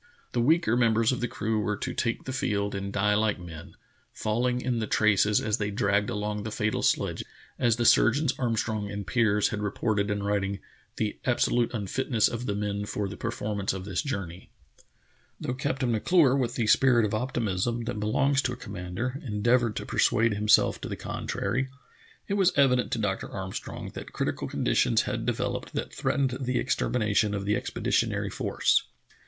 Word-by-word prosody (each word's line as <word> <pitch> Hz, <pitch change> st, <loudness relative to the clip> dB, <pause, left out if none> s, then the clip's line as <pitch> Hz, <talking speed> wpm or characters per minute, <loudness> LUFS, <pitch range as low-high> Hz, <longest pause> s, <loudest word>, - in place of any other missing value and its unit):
The 120 Hz, -, 0 dB
weaker 150 Hz, -2 st, +3 dB
members 115 Hz, -1 st, +3 dB
of 125 Hz, -, -2 dB
the 120 Hz, -, 0 dB
crew 110 Hz, -1 st, -1 dB
were 105 Hz, -1 st, -1 dB
to -, -, -4 dB
take 115 Hz, -2 st, -1 dB
the 130 Hz, -, -5 dB
field 100 Hz, -5 st, -1 dB
and 100 Hz, 0 st, -4 dB
die 105 Hz, +1 st, +2 dB
like 105 Hz, -2 st, +1 dB
men, 80 Hz, -3 st, -10 dB, 0.4 s
falling 120 Hz, +3 st, 0 dB
in 125 Hz, -2 st, -1 dB
the 110 Hz, -, -2 dB
traces 105 Hz, -1 st, +3 dB
as 105 Hz, 0 st, -1 dB
the}^ 105 Hz, -1 st, -1 dB
dragged 100 Hz, 0 st, +1 dB
along 105 Hz, 0 st, -2 dB
the 110 Hz, -, -4 dB
fatal 110 Hz, -1 st, -1 dB
sledge, -, -, +1 dB, 0.4 s
as 120 Hz, -2 st, +3 dB
the 120 Hz, 0 st, -1 dB
surgeons 135 Hz, +4 st, +4 dB
Armstrong 110 Hz, -4 st, -1 dB
and 100 Hz, 0 st, -5 dB
Piers 105 Hz, -3 st, +2 dB
had 105 Hz, -, -3 dB
reported 105 Hz, 0 st, 0 dB
in 100 Hz, 0 st, -1 dB
writing 100 Hz, -1 st, 0 dB, 0.4 s
"the 110 Hz, -1 st, -2 dB
absolute 120 Hz, -1 st, +2 dB
unfitness 115 Hz, +2 st, 0 dB
of 120 Hz, +1 st, -4 dB
the 100 Hz, -, -1 dB
men 105 Hz, 0 st, -2 dB
for 105 Hz, -1 st, -2 dB
the 100 Hz, -, -7 dB
performance 105 Hz, -4 st, -2 dB
of 95 Hz, -1 st, -6 dB
this 95 Hz, -3 st, -1 dB
journey." 95 Hz, -, -5 dB, 0.9 s
Though 125 Hz, -, -3 dB
Captain 130 Hz, -1 st, -1 dB
M'Clure, 135 Hz, -, +4 dB
with 125 Hz, -3 st, -1 dB
the 115 Hz, -, 0 dB
spirit 120 Hz, +1 st, +4 dB
of 105 Hz, -, -3 dB
op 125 Hz, +5 st, -2 dB
timism 115 Hz, +2 st, -1 dB
that 110 Hz, -, -3 dB
belongs 135 Hz, +7 st, +2 dB
to 125 Hz, -3 st, -1 dB
a -, -, -7 dB
commander, 100 Hz, +7 st, -5 dB
endeavored 115 Hz, 0 st, +1 dB
to -, -, -4 dB
persuade 115 Hz, 0 st, +2 dB
himself 105 Hz, +1 st, +3 dB
to -, -, -5 dB
the -, -, -3 dB
contrary, 125 Hz, +7 st, -3 dB, 0.6 s
it 200 Hz, -, -2 dB
was 195 Hz, -2 st, +4 dB
evident 125 Hz, -3 st, +3 dB
to -, -, 0 dB
Dr. 105 Hz, -3 st, -2 dB
Armstrong 95 Hz, -1 st, -6 dB
that -, -, -8 dB
critical -, -, -2 dB
conditions -, -, +2 dB
had -, -, -3 dB
developed -, -, -2 dB
that -, -, -4 dB
threatened 135 Hz, -2 st, 0 dB
the 125 Hz, -1 st, 0 dB
extermination 110 Hz, -4 st, +1 dB
of 100 Hz, -1 st, -3 dB
the 105 Hz, +1 st, +2 dB
expeditionary -, -, -1 dB
force. -, -, +1 dB
110 Hz, 180 wpm, -27 LUFS, 100-125 Hz, 0.9 s, surgeons